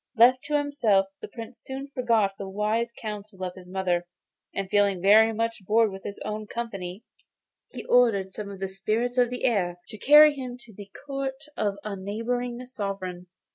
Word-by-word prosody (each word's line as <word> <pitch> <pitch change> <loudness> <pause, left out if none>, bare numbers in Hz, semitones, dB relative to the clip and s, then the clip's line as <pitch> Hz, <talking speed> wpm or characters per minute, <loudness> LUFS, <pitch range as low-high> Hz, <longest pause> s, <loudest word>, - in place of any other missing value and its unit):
Left 250 +3 +6
to 295 0 +1
himself 255 -10 +2 0.2
the - - -6
Prince 230 0 -9
soon 270 +1 -6
forgot 230 -6 +2
the 195 -1 -5
wise 215 +4 0
counsels 210 -3 -7
of 180 -1 -3
his 180 -1 -13
mother, 180 -2 -1 0.4
and 195 -1 -3
feeling 200 -1 +2
very 215 +4 +6
much 230 -1 -2
bored 220 +2 +3
with 195 0 -8
his 200 - -6
own 215 0 -4
company, 200 -4 -5 0.7
he - - -8
ordered 210 -6 +3
some 210 -1 -6
of 195 -1 -9
the 195 - -2
spirits 220 +6 -1
of 245 -1 +4
the 250 0 -5
air 180 -7 +1
to 215 - -8
carry 300 +1 +8
him 255 -3 -6
to 225 - -15
the 200 0 -11 0.2
court 275 0 -4
of 205 -2 0
a 210 -2 -4
neighbouring 240 +5 -3
sovereign. 195 -7 -5
215 Hz, 180 wpm, -26 LUFS, 195-245 Hz, 0.7 s, carry